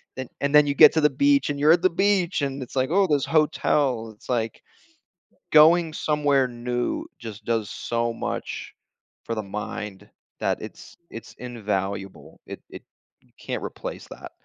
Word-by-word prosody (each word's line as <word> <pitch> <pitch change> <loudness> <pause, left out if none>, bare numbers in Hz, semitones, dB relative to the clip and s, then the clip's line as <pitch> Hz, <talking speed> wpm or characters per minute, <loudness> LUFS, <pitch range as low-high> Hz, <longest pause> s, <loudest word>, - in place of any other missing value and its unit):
then 130 -1 -5
and 140 +1 +1
then 150 - +8
you 140 - +1
get - - +8
to 160 - +2
the 150 - +5
beach, 280 - +2
and 145 - -3
you're 150 +2 +5
at 175 - +2
the 185 - +4
beach, 190 -1 +1
and 135 -1 -2
it's 125 - -12
like, 130 0 +1
"Ooh, 195 +4 +3
this 145 -4 +1
hotel." 140 -6 +1
It's 105 - -19
like, 115 -2 -2 0.9
going 160 +1 +6
somewhere 145 -3 +1
new 120 0 -3
just 110 -2 -9
does 115 -3 -1
so 115 0 -2
much - - -5 0.5
for 115 - -3
the 110 - -3
mind 105 0 -6 0.3
that - - 0
it's - - -11
it's 115 - -10
invaluable, 100 -5 -4
it - - -8
it - - -10 0.4
you - - -31
can't - - -4
replace - - -7
that. - - -10
135 Hz, 170 wpm, -24 LUFS, 115-155 Hz, 0.9 s, then